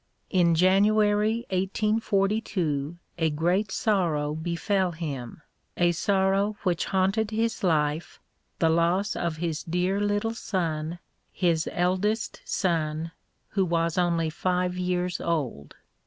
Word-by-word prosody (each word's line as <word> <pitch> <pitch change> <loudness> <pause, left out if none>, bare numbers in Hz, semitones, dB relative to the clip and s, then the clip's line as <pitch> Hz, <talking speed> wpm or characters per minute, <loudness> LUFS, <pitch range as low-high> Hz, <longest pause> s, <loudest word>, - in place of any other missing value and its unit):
In 175 -3 +4
January 210 +5 +3
1842 195 -5 0 0.2
a 160 -1 +2
great 175 +7 0
sorrow 165 -10 +1
befell 175 +3 -1
him, 145 -4 -6 0.3
a 175 0 +4
sorrow 195 +3 +1
which 175 -4 0
haunted 195 +3 +1
his 225 0 -1
life, 155 -2 0 0.4
the 165 - +3
loss 170 +5 +2
of 170 -2 -2
his 160 -2 -2
dear 180 +4 0
little 205 +2 0
son, 165 -6 -2 0.3
his 165 -3 +1
eldest 190 +5 0
son, 160 -2 -1 0.4
who 195 - +1
was 170 -2 0
only 170 -2 +1
five 180 +2 0
years 180 0 -1
old. 130 - -2
180 Hz, 110 wpm, -26 LUFS, 165-200 Hz, 0.4 s, In